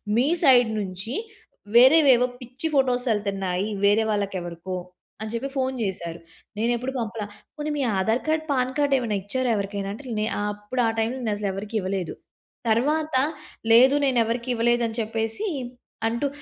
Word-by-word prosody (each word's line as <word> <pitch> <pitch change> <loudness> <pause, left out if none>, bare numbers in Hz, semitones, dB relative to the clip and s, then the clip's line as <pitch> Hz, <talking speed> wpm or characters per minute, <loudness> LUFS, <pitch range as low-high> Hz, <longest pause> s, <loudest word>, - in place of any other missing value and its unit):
"మీ 250 +5 +3 0.2
side 250 -5 +6
నుంచి 195 +4 -4 0.6
వేరేవేవో 260 0 +7 0.2
పిచ్చి 255 +6 -5
photos 255 -2 +2
ఎళ్తున్నాయి 195 -2 -2 0.2
వేరే 210 +2 +4
వాళ్ళకెవరికో," 185 -3 -3 0.5
అని 220 0 -4
చెప్పి 255 +4 -2
ఫోన్ 260 0 0
చేసారు. 170 -4 -4 0.4
నేనెప్పుడు 240 +4 0
పంపల. 225 -1 -3 0.3
"పోనీ 300 0 -3
మీ 280 - 0
ఆధార్ 220 +6 +1
కార్డ్, 315 0 +1
పాన్ 255 -1 +1
కార్డ్ 285 -1 +2
ఏమైనా 225 -5 -1
ఇచ్చారా 255 +4 -1
ఎవరికైనా?" 200 0 -3
అంటే 255 +3 -8
నే 215 - +1 0.2
అప్పుడు 210 +4 -2
ఆ - - +3
టైమ్‌లో 235 +4 -1
నేనసలు 205 -1 -1
ఎవరికి 210 +3 -6
ఇవ్వలేదు. 185 -2 -3 0.5
తర్వాత, 300 +7 +1 0.6
లేదు, 260 +4 +7
నేనెవరికీ 235 -1 +1
ఇవ్వలేదు, 240 +1 +2
అని 225 +1 -5
చెప్పేసి 225 - -2 0.6
అంటూ 235 +5 0
230 Hz, 145 wpm, -24 LUFS, 205-260 Hz, 0.6 s, వేరేవేవో